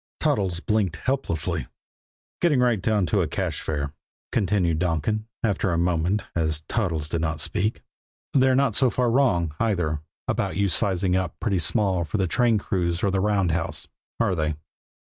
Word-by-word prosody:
Toddles 95 -4 0
blinked 105 -5 0
helplessly. 130 - -1 0.7
"Getting 155 -7 +3
right 120 -5 +2
down 105 -1 +2
to 80 - +1
a - - 0
cash - - -3
fare," 70 -2 -3 0.4
continued 95 -7 +1
Donkin, 90 +6 -1 0.2
after 100 -3 +1
a 85 - +1
moment, 90 +4 +1
as 80 -2 0
Toddles 85 -5 -1
did 85 0 -2
not 80 -1 -1
speak, 105 +8 -1 0.5
"they're 130 -1 +4
not 135 -3 +2
so 130 +4 +3
far 120 0 +1
wrong, 90 - +2
either, 90 -9 0 0.3
about - - -1
you 100 -1 +2
sizing 95 0 +2
up 95 -1 -2
pretty 100 -5 0
small 95 +1 +2
for 85 - -3
the 95 - +1
train 115 +4 +2
crews 90 -4 -1
or 100 - +2
the 95 - +1
roundhouse, 95 -5 0 0.3
are 115 -5 +2
they?" 80 -3 -1
95 Hz, 165 wpm, -25 LUFS, 85-110 Hz, 0.7 s, they're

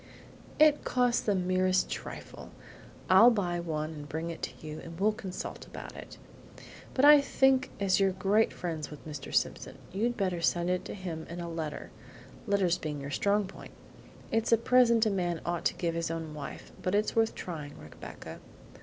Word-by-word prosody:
"It 305 -1 +5
costs 245 -1 +2
the 205 - +1
merest 185 0 +2
trifle. - - -7 0.6
I'll 235 - +8
buy 180 -7 0
one 155 -2 -3
and 145 -2 -9
bring 160 +3 -3
it 165 - -9
to - - -6
you, 155 0 -6
and 165 0 -10
we'll 210 +2 +4
consult 190 -3 -7
about - - -9
it; - - -10 0.8
but 270 - +4
I 295 0 +9
think 265 -2 +3
as 195 -1 +2
you're 195 -1 +4
great 195 +4 +2
friends 160 -4 -4
with 150 +1 -11
Mr. 150 -3 -7
Simpson - - -1
you'd 235 +5 -1
better 185 -5 -1
send 175 +1 +1
it 180 - -1
to - - -6
him 170 -5 -6
in 170 +1 -6
a 170 - -4
letter, 160 -2 -5 0.6
letters 195 -4 +2
being 150 -2 -4
your 140 +1 -6
strong 200 +7 +2
point! 190 - -11 0.6
It's 225 +1 +1
a 230 - +7
present 235 -1 +4
a 215 - +2
man 175 -3 -1
ought 170 -1 -2
to - - +2
give 170 -2 -1
his 165 0 -2
own 165 -2 -4
wife, 150 -2 -8
but 185 +2 0
it's 210 +1 +1
worth 225 -1 +2
trying, 150 -5 -6
Rebecca. 75 0 -10
185 Hz, 185 wpm, -30 LUFS, 165-215 Hz, 0.8 s, I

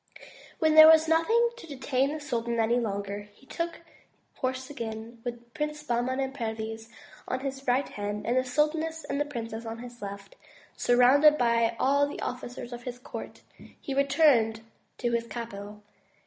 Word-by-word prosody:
When 315 -1 +3
there 315 0 +11
was 320 0 +7
nothing 450 +9 +3
to 485 - -11
detain 270 -1 0
the 310 - -4
sultan 235 -5 -2
any 230 +2 +3
longer, 200 -2 -4
he - - -21
took 335 +4 -4 0.6
horse 260 0 -2
again, 235 -6 -5
and 225 +1 -12
with 245 -1 -3
the 235 - -23
Princes 300 +2 -4
Bahman 250 0 0
and 265 0 -2
Perviz 225 -2 -5 0.4
on 255 - -2
his 270 0 -5
right 255 +3 +2
hand, 205 0 -5
and 240 - +1
the 255 - +3
sultaness 310 +4 0
and 280 - -2
the - - +1
princess 230 -5 -6
at 225 0 -6
his 240 -1 -10
left, 200 -1 -8 0.4
surrounded 270 +5 +5
by 235 -2 +2
all 280 +2 +3
the 290 - -7
officers 245 -1 -5
of 240 - -7
his 245 0 -6
court, 250 - -9 0.4
he 275 - -5
returned 270 -6 +3 0.4
to 240 -2 -1
his 235 0 -1
capital. 210 -3 -7
245 Hz, 175 wpm, -28 LUFS, 230-285 Hz, 0.6 s, there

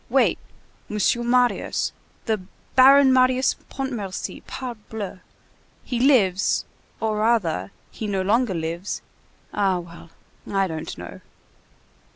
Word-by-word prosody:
Wait! - - +3 0.5
Monsieur 210 +3 +1
Marius—the 240 -3 0 0.3
Baron 265 +1 +7
Marius 255 0 +4 0.2
Pontmercy, 235 -9 -4
parbleu! 220 -6 -6 0.6
He 245 -2 -2
lives,—or 220 -2 +1
rather, 210 - +1 0.2
he 220 - -5
no 195 -2 0
longer 215 0 +2
lives,—ah 180 +3 -3
well, 170 -1 -10 0.4
I 195 -1 +2
don't 160 -3 -5
know." - - -9
215 Hz, 90 wpm, -23 LUFS, 190-250 Hz, 0.6 s, Baron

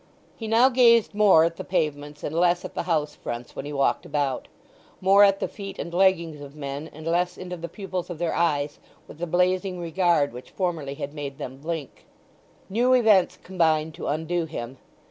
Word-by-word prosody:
He 225 - -6
now 230 +4 +5
gazed 235 -4 +5
more 205 -6 +6
at 165 0 0
the - - -5
pavements 150 -4 -2
and 150 - -3
less 175 +1 +2
at - - -7
the - - -2
house 150 -3 +1
fronts 120 -2 -7
when - - -5
he 145 - -5
walked 140 -1 +1
about; 140 -3 -2 0.5
more 195 +2 +6
at 195 -1 +4
the - - -1
feet 200 -2 -8
and 170 - -6
leggings 170 -5 +2
of 140 0 -10
men, 140 +1 -6
and 155 +1 -11
less 175 +2 0
into 180 -1 -6
the 170 0 -7
pupils 185 -1 -5
of 175 - -5
their 170 0 -1
eyes 150 -3 0 0.3
with 150 - -13
the 175 - -3
blazing 180 +2 +1
regard 170 -4 +1
which 125 +1 -10
formerly 165 -7 -3
had 145 -1 -6
made 140 -2 -6
them 130 +1 -7
blink. 155 0 -6 0.6
New 240 +6 +2
events 220 -7 +4
combined 160 -4 +1
to - - -6
undo 160 +3 -1
him. 130 -5 -7
170 Hz, 195 wpm, -25 LUFS, 150-185 Hz, 0.6 s, more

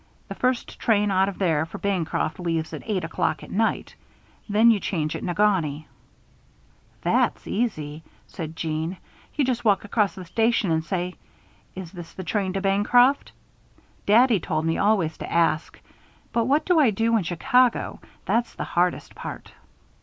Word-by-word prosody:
The - - -4
first 255 -1 -1
train 210 -2 +2
out 190 +1 +3
of 200 - -8
there 160 -6 +1
for 165 - -8
Bancroft 185 -4 -1
leaves 165 -2 -2
at - - -5
eight 195 -5 -1
o'clock 165 - -1
at - - -11
night. 220 +3 0 0.6
Then 220 +3 +5
you 215 - +2
change 160 -6 -2
at - - -5
Negaunee 175 -6 0 0.6
" - - -34
"That's - - +1
easy," 155 -10 -2 0.2
said 160 -3 -7
Jeanne. 160 +3 -3 0.4
"You 290 - +2
just 245 -2 -1
walk 205 -3 +2
across 205 -1 0
the 185 - -8
station 225 0 +1
and 160 0 +1
say: 180 +1 -3 0.6
'Is 185 -3 -7
this 175 -3 -10
the 185 - -7
train 195 0 -1
to 195 - -2
Bancroft?' 230 +7 +3 0.8
Daddy 230 +1 +5
told 155 -1 -2
me 165 0 +1
always 195 -6 +2
to - - -6
ask. 165 -2 +1 0.5
But 230 -1 +2
what 285 +5 +2
do 355 -3 +3
I 280 -6 +5
do 225 +3 +1
in 220 - +3
Chicago? 245 +9 +1 0.3
That's 235 0 0
the - - -4
hardest 175 +1 -1
part." - - -8
195 Hz, 165 wpm, -24 LUFS, 165-225 Hz, 0.8 s, Then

